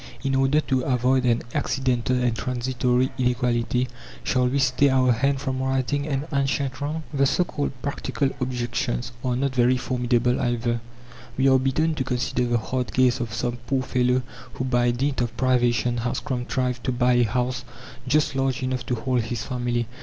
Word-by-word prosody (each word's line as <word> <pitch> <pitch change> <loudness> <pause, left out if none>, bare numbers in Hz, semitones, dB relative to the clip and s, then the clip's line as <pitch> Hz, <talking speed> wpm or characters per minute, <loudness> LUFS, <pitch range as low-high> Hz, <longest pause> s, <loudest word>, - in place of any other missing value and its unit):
In 135 -1 0
order 135 +3 +3
to 130 -3 0
avoid 125 0 +2
an 120 -1 +2
accidental 130 -2 0
and 125 -2 +1
transitory 125 +1 0
inequality, 125 -1 +1 0.4
shall 125 -1 +2
we 130 +3 0
stay 135 +1 +3
our 130 -1 +4
hand 135 +4 +1
from 130 -1 -2
righting 135 +2 0
an 140 -1 -1
ancient 135 -1 0
wrong? 155 +3 -2
The 140 -1 +3
so 180 - +2
called 145 -4 -3
practical 140 -1 -1
objections 120 0 -2
are 125 -1 0
not 135 +1 0
very 125 0 +3
formidable 125 -1 +1
either. 120 -1 0 0.6
We 135 +1 +3
are 130 0 +5
bidden 155 +5 +1
to 150 -4 -2
consider 125 -1 -1
the 120 0 +2
hard 125 +2 -3
case 130 -2 +3
of 120 -3 -3
some 120 +1 -2
poor 130 +1 +1
fellow 125 0 +1 0.3
who 130 - -3
by 120 -1 +2
dint 130 +2 0
of 120 -1 -3
privation 120 -1 +2
has 120 +1 -1
contrived 125 -2 -2
to 130 - +1
buy 125 0 +2
a 120 0 +4
house 125 +2 -1 0.4
just 145 +2 +2
large 135 0 0
enough 130 -1 -1
to 125 - 0
hold 125 +1 0
his 115 0 -4
family. 120 -1 -1
125 Hz, 175 wpm, -24 LUFS, 120-135 Hz, 0.6 s, are